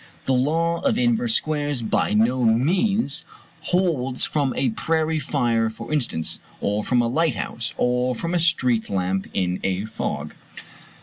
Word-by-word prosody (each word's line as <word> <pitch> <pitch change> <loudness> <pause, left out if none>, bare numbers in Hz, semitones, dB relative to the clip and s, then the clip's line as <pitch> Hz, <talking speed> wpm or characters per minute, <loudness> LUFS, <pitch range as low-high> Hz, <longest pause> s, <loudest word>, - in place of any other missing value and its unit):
The 135 - +2
law 165 +6 +1
of 260 -5 +1
inverse 240 -1 +2
squares 145 -4 -1
by 105 -1 +1
no 120 +4 +2
means 160 - +2 0.4
holds 155 -9 +1
from 145 -3 0
a 130 -4 +1
prairie 160 +5 0
fire 115 -5 +1
for 110 +7 -7
instance, 120 - -1 0.2
or 105 +1 -1
from 120 +1 +2
a - - +1
lighthouse, 125 -4 -1
or 125 +1 +1
from 170 +8 -3
a 175 - +2
street 125 -9 +2
lamp 95 0 -1
in 90 -1 -1
a 95 +2 -1
fog. 110 - -4
130 Hz, 145 wpm, -23 LUFS, 115-165 Hz, 0.4 s, The